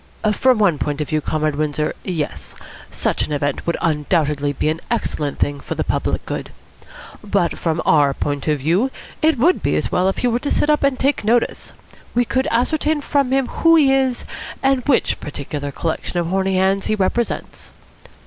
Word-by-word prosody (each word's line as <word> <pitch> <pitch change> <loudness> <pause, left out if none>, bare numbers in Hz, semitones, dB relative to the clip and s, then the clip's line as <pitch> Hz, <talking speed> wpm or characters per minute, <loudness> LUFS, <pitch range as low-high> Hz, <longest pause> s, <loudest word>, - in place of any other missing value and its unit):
"From 255 +3 +3
one 190 -8 +2
point 145 0 -2
of 150 - -3
view, 155 0 0
Comrade 155 -1 -1
Windsor, 150 0 -1
yes. 165 -5 -4 0.3
Such - - -1
an - - -9
event 145 0 -2
would 170 - +1
undoubtedly 150 -2 +1
be 145 - -2
an 160 +1 -1
excellent 145 -2 -2
thing 145 0 -1
for - - -5
the - - -1
public - - -1
good. - - -4 0.7
But 200 -4 0
from 165 -1 -1
our 145 -3 +4
point 145 0 -3
of 150 -1 +2
view, 170 - +1 0.3
it 315 -2 +3
would 330 +10 +3
be - - +1
as - - -1
well 185 +1 +2
if 195 - -3
he 250 - +1
were 240 0 +1
to 285 - -3
sit 300 - +2
up 300 - +2
and 275 -2 +2
take 275 -1 +1
notice. 230 +3 0 0.4
We 245 0 +3
could 260 +3 0
ascertain 300 +6 +1
from 280 -2 +1
him 270 0 +2
who 330 0 +4
he 280 -4 +5
is 260 -2 +1 0.4
and 270 -1 +3
which 275 - +2
particular 145 -1 -5
collection 160 +4 -3
of 170 - +1
horny 190 +1 +1
handeds 190 +1 +1
he 215 - +1
represents. 215 +4 -2
190 Hz, 190 wpm, -20 LUFS, -, 0.7 s, he